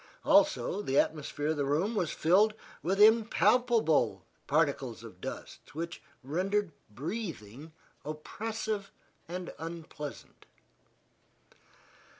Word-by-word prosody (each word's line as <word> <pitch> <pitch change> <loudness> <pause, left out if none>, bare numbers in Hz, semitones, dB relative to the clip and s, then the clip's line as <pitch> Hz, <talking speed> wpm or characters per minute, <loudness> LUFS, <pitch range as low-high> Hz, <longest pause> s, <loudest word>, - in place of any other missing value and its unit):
Also 300 - +3
the 135 -8 -1
atmosphere 150 -1 0
of 160 - 0
the 145 - +1
room 155 +11 +1
was 180 -8 0
filled 200 +9 +3 0.3
with 190 +4 0
impalpable 225 - +4 0.2
particles - - 0
of - - -12
dust, - - -8
which 170 +2 -5 0.2
rendered 185 +7 0 0.2
breathing 150 - -6 0.3
oppressive 205 +7 -4 0.4
and 180 +1 -5
unpleasant. 160 -3 -8
175 Hz, 95 wpm, -31 LUFS, 155-215 Hz, 0.4 s, impalpable